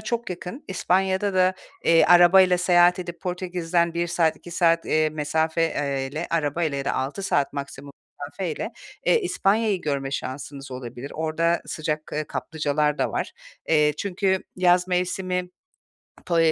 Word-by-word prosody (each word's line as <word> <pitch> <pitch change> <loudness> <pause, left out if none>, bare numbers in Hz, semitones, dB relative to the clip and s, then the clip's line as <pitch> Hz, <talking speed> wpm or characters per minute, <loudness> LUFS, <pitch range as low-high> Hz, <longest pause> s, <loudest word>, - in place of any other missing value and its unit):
çok 230 -1 -3
yakın, 180 - -7
İspanya’da 190 +1 0
da, 185 0 +3 0.3
eee, 165 0 +5
arabayla 180 +1 +6
seyahat 180 0 +4
edip 175 -1 -7
Portekiz’den 175 -2 -1
1 170 0 0
saat, 165 -2 +1
2 175 - -13
saat, 165 -1 +2
eee, 155 0 +2
mesafeyle 155 -1 -1
arabayla 155 -1 0
ya 135 - -4
da - - 0
6 140 +9 -3
saat 140 -7 0
maksimum 140 0 -7 0.3
mesafeyle, 170 +7 -4 0.3
eee, 465 - +4
İspanya’yı 210 - +1
görme 140 -2 -2
şansınız 140 +1 -6
olabilir. 125 +1 -7
Orada 165 +2 0
sıcak, 155 -1 -3
eee, 155 0 -2
kaplıcalar 150 -1 -1
da - - 0
var. - - -3 0.4
Eee, 150 -2 +4
çünkü 190 -1 0
yaz 180 0 +3
mevsimi 180 0 -1 0.8
Po 170 -2 0
170 Hz, 140 wpm, -24 LUFS, 150-185 Hz, 0.8 s, arabayla